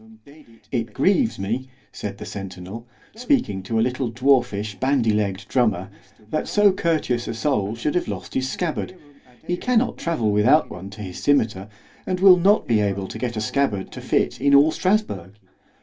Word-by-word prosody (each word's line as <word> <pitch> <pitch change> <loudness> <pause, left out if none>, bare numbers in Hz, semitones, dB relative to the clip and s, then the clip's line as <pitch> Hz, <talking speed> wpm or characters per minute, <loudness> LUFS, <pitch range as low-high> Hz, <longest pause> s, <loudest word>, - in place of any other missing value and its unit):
It 115 -3 -3
grieves, 200 - +2
me, 115 +7 -3 0.2
said - - -6
the - - -8
centinel, 95 +4 -8 0.3
speaking 240 - 0
to 110 +4 -3
a 110 - +3
little 125 0 -2
dwarfish 120 -5 +1
bandy 130 -4 +2
legg'd 100 -2 -1
drummer, 100 -7 0 0.4
that 155 - -1
so 205 -1 +4
courteous 155 -9 -1
a - - -4
soul 110 -5 0
should 120 +6 -2
have 180 - 0
lost - - -6
his 130 0 -1
scabbard——he 150 -3 -5
cannot 245 +2 0
travel 120 -11 0
without 120 +10 +3
one 95 +2 -8
to 105 +1 -10
his 90 -2 -7
scymetar, 110 -8 +1 0.4
and 185 -1 -1
will 190 -1 +8
not 195 +3 +3
be 115 -3 +3
able 100 -2 -1
to - - -7
get 120 -3 -3
a - - -1
scabbard 110 -5 -1
to - - -8
fit - - +2
it - - -5
in 140 0 +5
all 145 +3 +6
_Strasburg. 180 - -1
125 Hz, 175 wpm, -22 LUFS, 105-155 Hz, 0.4 s, will